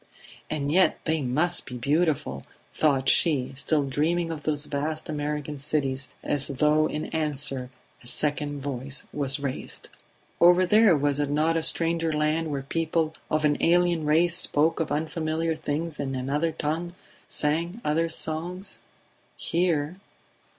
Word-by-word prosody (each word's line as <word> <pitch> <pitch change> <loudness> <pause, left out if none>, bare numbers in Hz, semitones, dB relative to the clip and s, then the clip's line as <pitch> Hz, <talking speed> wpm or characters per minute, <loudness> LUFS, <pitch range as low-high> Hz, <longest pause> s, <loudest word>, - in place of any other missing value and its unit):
"And 145 -2 -2
yet 185 +3 +4
they 160 -1 +1
must 155 +7 +1
be 125 - -6
beautiful!" 145 - 0 0.3
thought 135 -4 +2
she, 140 -7 +3
still 145 +2 0
dreaming 165 +5 0
of 155 -2 -5
those 150 -1 -1
vast 155 +3 -3
American 150 -1 -3
cities... 135 -2 -1
As 140 -1 +1
though 150 +2 +2
in 155 +1 -3
answer, 145 -4 0 0.3
a - - -14
second 145 +1 -1
voice 135 0 -2
was 140 -1 0
raised. 140 -2 -5 0.5
Over 180 +2 +6
there 210 -2 +5
was 145 0 +1
it 145 -1 0
not 155 +3 +1
a 165 - +1
stranger 165 0 +2
land 155 +1 0
where 140 -2 -3
people 160 +1 -1 0.2
of 155 0 +1
an 145 -1 +2
alien 175 -1 +3
race 165 +3 +4
spoke 160 -2 +2
of 160 -3 -2
unfamiliar 160 +1 -1
things 155 +1 -3
in 135 -1 -2
another 145 +6 -1
tongue, 165 +3 -3 0.3
sang 165 +7 -1
other 165 +3 +1
songs? 175 +5 -5 0.6
Here 170 -1 0
155 Hz, 145 wpm, -26 LUFS, 145-165 Hz, 0.6 s, Over